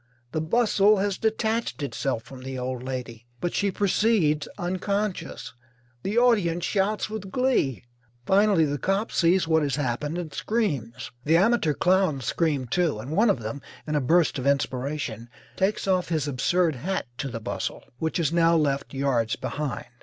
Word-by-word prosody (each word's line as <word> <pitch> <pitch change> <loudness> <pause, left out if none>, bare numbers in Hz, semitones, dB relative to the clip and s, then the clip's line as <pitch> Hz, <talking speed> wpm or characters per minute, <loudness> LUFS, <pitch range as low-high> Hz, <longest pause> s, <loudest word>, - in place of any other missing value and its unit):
the 155 - -1
bustle 210 +3 +3
has 200 0 -1
detached 220 -5 -1
itself 135 -4 -2
from 130 -1 -11
the 130 0 -5
old 125 0 -3
lady, 125 -3 -6
but 175 - -2
she 200 - +1
proceeds, 195 -5 +2
unconscious. 190 0 -3 0.5
The 205 - -2
audience 200 -9 +3
shouts 205 +1 0
with 215 -3 -6
glee. 250 - +1 0.4
Finally 195 -3 +4
the 145 -1 -2
cop 195 - 0
sees 170 0 +3
what 160 -1 +3
has 140 -3 0
happened 145 +3 -2
and 170 -4 -5
screams. 135 - -2
The 160 +4 +4
amateur 190 -6 +3
clowns 180 -8 +2
scream, 145 -1 0
too, 165 0 0
and 120 +7 -7
one 210 +8 +3
of 130 - +1
them, 115 +6 -5 0.2
in 155 - -3
a 150 - +2
burst 160 +1 +3
of 130 - -2
inspiration, 130 -4 -1 0.3
takes 195 +1 0
off 185 -2 +1
his 155 -4 0
absurd 150 +3 +1
hat 190 +9 -2
to 140 - -2
the 115 - -5
bustle, 110 - -4 0.2
which 160 +2 -1
is 165 -1 +1
now 170 0 +4
left 140 -3 0
yards 125 -5 +1
behind. 135 +2 -4
160 Hz, 165 wpm, -26 LUFS, 135-195 Hz, 0.5 s, Finally